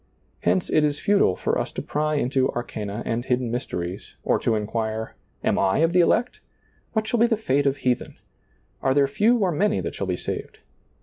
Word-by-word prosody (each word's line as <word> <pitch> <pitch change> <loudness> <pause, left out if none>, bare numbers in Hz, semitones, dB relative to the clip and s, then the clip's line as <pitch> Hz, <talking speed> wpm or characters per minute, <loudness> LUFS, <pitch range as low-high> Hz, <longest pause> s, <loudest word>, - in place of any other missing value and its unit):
Hence 90 +1 +1
it 155 - +4
is 145 -1 0
futile 200 - +3
for - - -1
us - - -3
to - - -3
pry 150 +1 -1
into 130 -1 +1
arcana 110 -2 -4
and 115 +1 -1
hidden 125 -2 0
mysteries, 90 -6 -4
or - - +2
to 115 - +1
inquire. 110 +1 -2 0.3
Am - - +2
I 95 -1 +2
of 165 - -1
the 180 - +4
elect? 230 +8 +2 0.5
What 220 -1 0
shall 225 +1 0
be 235 - +5
the 225 -2 +1
fete 145 -9 +1
of 140 +1 +1
heathen? 125 -2 -1 0.7
Are 135 0 +2
there 140 -1 +4
few 220 - +3
or 195 -5 +1
many 210 +7 +1
that - - -4
shall 100 - -4
be 90 -1 -1
saved - - -5
135 Hz, 200 wpm, -24 LUFS, 110-180 Hz, 0.7 s, be